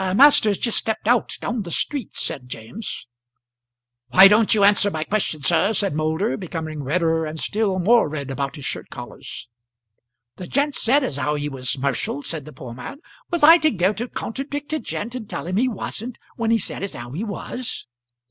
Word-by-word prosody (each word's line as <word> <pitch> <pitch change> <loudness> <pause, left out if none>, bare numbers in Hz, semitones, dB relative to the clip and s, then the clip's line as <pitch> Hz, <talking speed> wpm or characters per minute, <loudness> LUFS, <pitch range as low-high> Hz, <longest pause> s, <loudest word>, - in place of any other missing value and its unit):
"Master's 220 -6 +6
just 235 - +1
stepped 220 -1 -3
out, 245 0 +2
down 240 -2 -2
the 180 - -7
street," 275 - -2
said 125 -5 -4
James. 125 - -6 1.0
"Why 190 +11 +9
don't 210 +2 +4
you 205 - +3
answer 205 0 +5
my 155 -5 -3
question, 160 -6 -2
sir?" 200 +10 +3
said 200 -6 +1
Moulder, 160 +8 0
becoming 160 -5 -5
redder 160 +3 +1
and 155 0 -5
still 205 0 0
more 215 0 +4
red 140 -3 -5
about 135 +2 -3
his 145 -4 -8
shirt - - -4
collars. - - -9 0.9
"The 180 - -7
gent 285 +2 +1
said 270 +4 +2
as 145 - -3
how 150 +2 0
he 145 0 -2
was 130 -1 -2
'mercial," 140 +1 -2
said 155 -4 -5
the 155 - -10
poor 130 -6 -9
man. 125 - -8 0.3
"Was 345 -3 -1
I 325 +3 +9
to 310 0 +3
go 190 - +1
to 235 +4 -4
contradict 285 +5 -5
a 310 - +1
gent 230 0 -5
and 240 -5 -7
tell - - -5
him 185 +2 -2
he 250 +4 +3
wasn't 235 +1 -5 0.2
when 230 -1 -1
he 230 - +4
said 205 - -4
as 200 - -4
how 120 0 -8
he 165 +10 -4
was?" 230 +3 -5
195 Hz, 195 wpm, -22 LUFS, 155-230 Hz, 1.0 s, Why